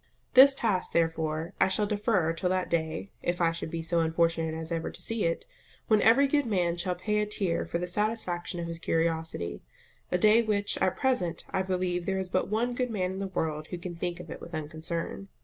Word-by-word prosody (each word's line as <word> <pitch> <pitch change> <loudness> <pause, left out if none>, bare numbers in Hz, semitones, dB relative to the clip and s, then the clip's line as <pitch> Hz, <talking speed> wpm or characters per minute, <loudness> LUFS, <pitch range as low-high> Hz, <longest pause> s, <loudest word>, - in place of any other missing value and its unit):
This 270 +2 +9
task, 205 -8 0
therefore, 165 +1 0
I - - +6
shall 205 +2 +1
defer 205 -5 +1
till 180 +2 -1
that 185 0 -1
day 160 +2 -1
(if 175 0 -1
I 170 -1 +3
should 165 -1 -4
be 165 0 -4
so 170 +1 +1
unfortunate 165 0 +1
as 160 +1 -6
ever 165 -1 -2
to - - -8
see 225 -4 -1
it) 165 - -1 0.4
when 215 -2 +5
every 270 +5 +6
good 285 -2 +1
man 180 -5 +1
shall 180 +1 -1
pay 210 +4 0
a 210 - 0
tear 195 -5 -1
for - - -1
the 175 +1 -3
satisfaction 185 -3 -2
of 170 - -3
his 165 0 -4
curiosity; 160 - -1 0.5
a 180 - +3
day 215 +5 +6
which, 205 -2 0
at 185 - +2
present, 190 - 0
I 190 - +1
believe, 180 -2 -1
there 190 0 0
is 190 -1 -2
but 185 - 0
one 235 +4 0
good 250 0 -1
man 185 -5 -1
in 190 - -5
the 195 - -2
world 155 -4 -2
who 180 - -5
can 175 0 -6
think 170 0 -3
of - - -9
it - - -7
with 170 - -7
unconcern. 160 +5 -4
180 Hz, 220 wpm, -29 LUFS, 165-210 Hz, 0.5 s, This